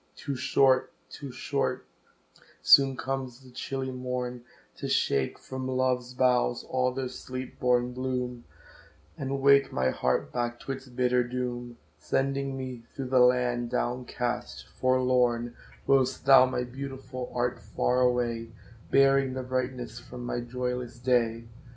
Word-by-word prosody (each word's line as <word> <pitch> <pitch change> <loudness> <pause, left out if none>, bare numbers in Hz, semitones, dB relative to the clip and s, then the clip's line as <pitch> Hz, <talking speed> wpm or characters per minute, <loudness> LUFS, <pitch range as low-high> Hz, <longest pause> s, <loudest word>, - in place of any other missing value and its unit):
Too 140 -2 -4
short 130 0 +3 0.2
too 140 -2 -7
short - - -2 0.8
soon 135 -1 +7
comes 130 -1 -4
the 130 - -15
chilly 130 +1 -4
morn, 125 -1 -4 0.3
To - - -4
shake 70 -1 +1
from 130 0 -6
love's 130 -1 0
boughs 125 -1 +2
all 125 0 0
their 130 0 -3
sleep 130 0 -7
born 125 0 +2
bloom, 125 -1 -3 0.7
And 140 -3 -3
wake 140 0 +5
my 65 0 +1
heart 65 - -1
back 120 -1 -2
to - - -5
its 135 0 -6
bitter 125 0 +1
doom, 120 -1 -4 0.2
Sending 135 - -1
me 130 -2 -6
through 135 -2 -4
the 130 0 +4
land 125 -1 +3
down 125 0 -1
cast, 120 0 -4
forlorn, 125 -2 +1 0.3
Whilst 130 -1 +2
thou, 135 -1 +8
my 125 -1 -1
Beautiful, 130 0 -7
art 120 0 0
far 125 +5 0
away, 120 -2 +1 0.4
Bearing 135 -1 +4
the 130 - -3
brightness 125 -2 -3
from 125 0 -9
my 120 - -2
joyless 125 0 -4
day. 120 -2 +1
125 Hz, 140 wpm, -28 LUFS, 120-130 Hz, 0.8 s, thou